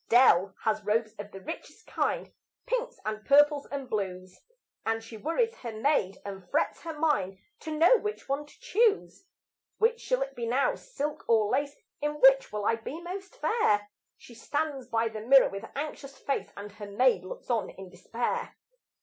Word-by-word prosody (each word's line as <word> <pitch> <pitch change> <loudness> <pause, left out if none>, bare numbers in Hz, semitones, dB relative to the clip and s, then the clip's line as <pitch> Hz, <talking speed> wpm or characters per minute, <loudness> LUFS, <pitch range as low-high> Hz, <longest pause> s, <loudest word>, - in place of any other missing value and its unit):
Dell 200 -6 +5
has 215 -1 0
robes 215 +2 0
of 205 0 -6
the 195 - -9
richest 305 - -8
kind - - -2 0.3
Pinks - - -2
and 215 0 -3
purples 290 +1 +5
and 275 -2 -4
blues; 185 -4 -4 0.4
And 225 0 -1
she 225 0 -10
worries 335 - 0
her 235 - -6
maid 215 -5 +1
and 195 -3 -8
frets 305 - 0
her 325 -2 -6
mind 200 -12 +1 0.2
To 310 -1 -5
know 350 +10 +6
which 420 0 -5
one 280 +2 -2
to - - -20
choose. 405 - +1 0.5
Which 465 +1 +2
shall - - +1
it 270 0 -9
be 235 -1 -3
now, 275 - +2
silk 300 - -5
or 220 -3 +4
lace? 285 +2 0 0.3
In 295 0 0
which 270 0 +6
will 210 -1 -3
I 225 - +2
be 270 +8 -7
most 380 +6 -7
fair? 210 - +1 0.3
She 240 - -15
stands 285 +2 -3
by 230 -1 +1
the 220 -1 -6
mirror 265 +4 +6
with 195 +3 -7
anxious 280 -1 -5
face, 275 - -2
And 205 +1 -7
her 205 0 -9
maid 210 -2 +3
looks 185 - -7
on 230 -2 0
in 190 -1 -11
despair. 230 +6 -3
255 Hz, 180 wpm, -29 LUFS, 210-305 Hz, 0.5 s, know